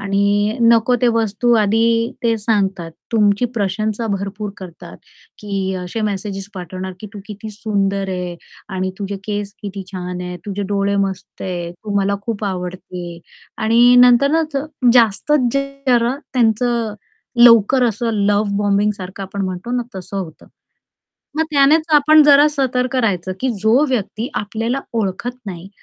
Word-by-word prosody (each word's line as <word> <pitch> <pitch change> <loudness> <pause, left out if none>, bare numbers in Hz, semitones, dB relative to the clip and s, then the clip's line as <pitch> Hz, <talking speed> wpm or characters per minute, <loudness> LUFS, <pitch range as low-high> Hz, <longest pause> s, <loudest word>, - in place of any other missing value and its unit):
आणि 200 +2 +1
नको 230 +1 +4
ते 245 - +5
वस्तू 225 +2 +1
आधी 230 +2 +2
ते 230 -1 +2
सांगतात, 195 -6 -1 0.2
तुमची 210 0 +3
प्रशंसा 215 +2 -1
भरपूर 200 0 -3
करतात, 180 -3 -11 0.4
की 195 -2 -3
असे 180 +5 -5
मेसेज 200 -1 -3
पाठवणार 185 +1 -6
की 215 - -7
तू - - -7
किती 215 +1 -8
सुंदर 200 -2 -1
आहे 180 -2 -4 0.4
आणि 185 0 -1
तुझे 200 -1 -4
केस 205 -1 -3
किती 200 -1 -6
छान 180 -1 -5
आहेत, 180 0 -6
तुझे 205 0 -3
डोळे 200 0 0
मस्त 190 -1 -8
आहेत, 175 -2 -4
तू 205 - -4
मला 200 +1 +1
खूप 220 -1 -4
आवडते 180 -2 -6 0.4
आणि 235 +3 +5
नंतरच 280 +5 +4 0.4
जास्तच 245 +3 +3
जरा 275 -3 0 0.2
त्यांचं 235 -2 +1 0.5
लवकर 235 +2 +6
असं 230 +1 0 0.2
लव्ह 205 0 +2
बॉम्बिंगसारखं 200 -2 -1
आपण 195 +1 -5
म्हणतो 185 +5 -5
ना, 245 - 0
तसं 190 +1 -7
होतं. 165 -5 -8 0.9
मग 320 - +2
त्यानेच 300 +2 +4
आपण 310 +1 +6
जरा 290 0 +7
सतर्क 255 -2 -1
राहायचं, 190 -7 0
की 260 - 0
जो 235 +7 +4
व्यक्ती 230 -1 -2
आपल्याला 225 +5 -2 0.2
ओळखत 220 +4 -3
नाही, 180 -1 -7
210 Hz, 140 wpm, -18 LUFS, 195-235 Hz, 0.9 s, जरा